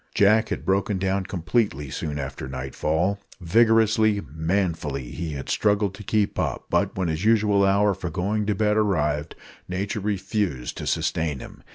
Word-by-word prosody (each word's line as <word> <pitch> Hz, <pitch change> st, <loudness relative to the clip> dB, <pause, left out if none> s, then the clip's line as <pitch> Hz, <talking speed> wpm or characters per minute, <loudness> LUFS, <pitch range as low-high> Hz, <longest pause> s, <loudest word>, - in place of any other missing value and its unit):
Jack 105 Hz, +2 st, +4 dB
had -, -, -4 dB
broken 95 Hz, +1 st, +1 dB
down 95 Hz, 0 st, 0 dB
completely 85 Hz, -, -1 dB
soon 75 Hz, +1 st, -3 dB
after 65 Hz, -2 st, -5 dB
nightfall. 75 Hz, +9 st, -1 dB, 0.2 s
Vigorously, 110 Hz, +2 st, +3 dB
manfully 80 Hz, -6 st, -1 dB
had 75 Hz, -6 st, -5 dB
he -, -, +2 dB
struggled 105 Hz, -2 st, +1 dB
to 100 Hz, -, -10 dB
keep 105 Hz, 0 st, 0 dB
up; -, -, -2 dB
but -, -, +1 dB
when 95 Hz, -2 st, 0 dB
his 80 Hz, +3 st, -2 dB
usual 105 Hz, -2 st, +4 dB
hour 100 Hz, +1 st, +3 dB
for 90 Hz, -1 st, -5 dB
going 100 Hz, +5 st, -1 dB
to 105 Hz, -, +1 dB
bed 105 Hz, +1 st, +2 dB
arrived, 75 Hz, -7 st, 0 dB, 0.3 s
nature 100 Hz, +4 st, -2 dB
refused 95 Hz, -, -2 dB
to -, -, -5 dB
sustain 80 Hz, -3 st, 0 dB
him. -, -, -11 dB
95 Hz, 160 wpm, -24 LUFS, 80-105 Hz, 0.3 s, Jack